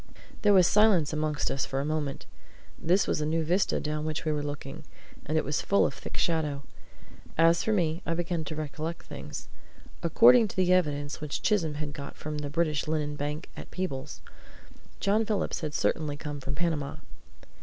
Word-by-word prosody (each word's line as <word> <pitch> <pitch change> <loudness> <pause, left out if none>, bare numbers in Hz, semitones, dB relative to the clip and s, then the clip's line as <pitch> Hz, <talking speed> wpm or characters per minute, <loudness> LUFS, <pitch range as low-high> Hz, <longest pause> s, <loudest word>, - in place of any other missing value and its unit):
There 205 - +5
was 185 -3 +7
silence 195 -7 +4
amongst 155 -1 -1
us 135 - -1
for 135 - -2
a 140 - -1
moment. 150 -2 -2 0.5
This 180 +4 +3
was - - 0
a - - 0
new 160 +1 +1
vista 180 +5 +1
down 150 0 -2
which 155 0 -3
we 155 - +1
were 150 -1 0
looking, 145 +1 -6 0.4
and 155 +2 +1
it - - +1
was 145 +2 0
full 200 - +3
of - - -1
thick - - -8
shadow. 150 -5 0 0.7
As 165 +1 +5
for 220 - 0
me, 170 -4 +1
I 165 - -1
began 170 -1 -1
to 155 - -5
recollect 155 +2 -4
things. 70 +1 -8 0.5
According 230 +7 +6
to - - -9
the 185 -1 +3
evidence 145 -5 0
which 150 -2 -4
Chisholm 165 -8 +2
had 150 -1 -4
got 140 -2 -7
from 150 0 -4
the 145 -1 -4
British 155 -1 0
Linen 150 -1 -1
Bank 150 +3 -4
at - - -9
Peebles, 180 -8 -4 0.8
John 205 +3 +2
Phillips 210 -4 -1
had 150 -2 -3
certainly 150 -2 0
come 145 -1 -5
from 140 +1 -4
Panama. 155 -3 -1
155 Hz, 185 wpm, -28 LUFS, 145-175 Hz, 0.8 s, was